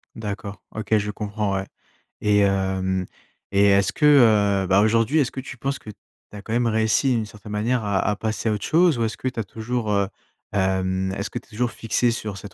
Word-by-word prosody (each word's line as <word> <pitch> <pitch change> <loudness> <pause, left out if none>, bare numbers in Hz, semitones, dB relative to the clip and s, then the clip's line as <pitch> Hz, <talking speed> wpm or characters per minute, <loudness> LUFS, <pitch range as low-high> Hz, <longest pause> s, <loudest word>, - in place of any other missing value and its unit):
D'accord. 105 -2 -6
OK, 110 0 0
je 105 0 -2
comprends, 105 -1 -2
ouais. 95 0 -2 0.6
Et 105 -1 +3
hem 95 -1 +1 0.5
et 100 0 +4
est-ce 100 0 +4
que, 150 - +1 0.6
heu, - - -5
bah, 95 +2 +4
aujourd'hui, 115 +7 +3
est-ce 130 - +1
que 135 - -6
tu 130 -1 -8
penses 135 +3 -2
que 110 - -12
tu 100 - -19 0.3
as 105 -1 -9
quand 110 - -5
même 120 0 +2
réussi 110 +4 +2
d'une 110 -2 -1
certaine 105 0 -12
manière 115 +3 0
à 100 -2 0
à 105 +1 0
passer 110 +1 -2
à - - +1
autre 105 - -4
chose 165 -4 +3
ou 115 - 0
est-ce 110 - -4
que 130 - -4
tu 125 -2 -3
as - - 0
toujours, 110 +1 -3
heu, 100 -1 +2 0.5
hem 95 -1 0
est-ce 100 +1 -3
que - - -4
tu - - -24
es - - -24
toujours 120 +2 -1
fixé 115 +1 0
sur 105 -3 -4
cette 100 +1 -10
105 Hz, 230 wpm, -23 LUFS, 100-115 Hz, 0.6 s, et